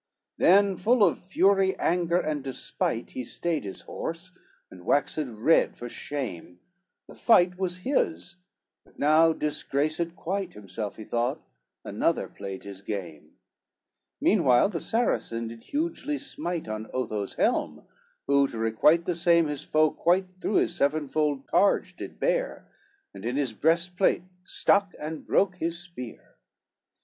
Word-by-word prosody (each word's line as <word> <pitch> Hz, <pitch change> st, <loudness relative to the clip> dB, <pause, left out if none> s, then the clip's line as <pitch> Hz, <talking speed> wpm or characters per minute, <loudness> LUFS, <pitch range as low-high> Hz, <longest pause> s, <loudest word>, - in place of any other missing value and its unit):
XXXI -, -, -40 dB
Then 195 Hz, +1 st, +5 dB
full 235 Hz, 0 st, +3 dB
of 175 Hz, -, +3 dB
fury, 190 Hz, +1 st, +2 dB
anger 175 Hz, 0 st, +1 dB
and 150 Hz, -5 st, -2 dB
despite, 130 Hz, -3 st, -3 dB
He 130 Hz, -, -5 dB
stayed 165 Hz, +6 st, -2 dB
his 100 Hz, -2 st, -7 dB
horse, 165 Hz, +3 st, -6 dB, 0.4 s
and 90 Hz, -1 st, -12 dB
waxed 145 Hz, -, +1 dB
red 125 Hz, +2 st, +2 dB
for 120 Hz, -, -6 dB
shame, 115 Hz, -, -6 dB, 0.5 s
The -, -, -12 dB
fight 180 Hz, -5 st, +4 dB
was 180 Hz, -1 st, -2 dB
his, 290 Hz, -, -1 dB, 0.5 s
but -, -, -25 dB
now 155 Hz, +3 st, +5 dB
disgraced 155 Hz, +2 st, -2 dB
quite 190 Hz, +3 st, -3 dB
Himself 105 Hz, 0 st, -6 dB
he 110 Hz, -, -9 dB
thought, 120 Hz, +7 st, -1 dB, 0.4 s
another -, -, 0 dB
played 95 Hz, -1 st, -8 dB
his 100 Hz, -1 st, -9 dB
game; 90 Hz, -7 st, -6 dB, 0.9 s
Meanwhile 125 Hz, +8 st, +4 dB
the 175 Hz, -5 st, -3 dB
Saracen 115 Hz, -, -1 dB
did 115 Hz, 0 st, -11 dB
hugely 300 Hz, -1 st, -2 dB
smite 225 Hz, -, -4 dB
On 110 Hz, 0 st, -5 dB
Otho's 105 Hz, -6 st, -3 dB
helm, -, -, 0 dB, 0.4 s
who 140 Hz, 0 st, +4 dB
to 115 Hz, -, -8 dB
requite 115 Hz, +10 st, +3 dB
the 180 Hz, -, 0 dB
same, 170 Hz, -1 st, +4 dB
His 150 Hz, -2 st, -4 dB
foe 155 Hz, 0 st, +3 dB
quite 185 Hz, +2 st, +2 dB, 0.2 s
through 205 Hz, -, -1 dB
his -, -, +2 dB
sevenfold 145 Hz, -1 st, 0 dB
targe 200 Hz, -, +2 dB
did -, -, -9 dB
bear, -, -, -1 dB, 0.5 s
And -, -, -10 dB
in 125 Hz, +4 st, -2 dB
his 135 Hz, -6 st, -1 dB
breastplate 170 Hz, -, +2 dB, 0.2 s
stuck 200 Hz, +1 st, +2 dB
and 155 Hz, +1 st, -6 dB
broke 190 Hz, -2 st, +2 dB
his 165 Hz, 0 st, -2 dB
spear. 170 Hz, -9 st, -10 dB
155 Hz, 140 wpm, -27 LUFS, 120-180 Hz, 0.9 s, Then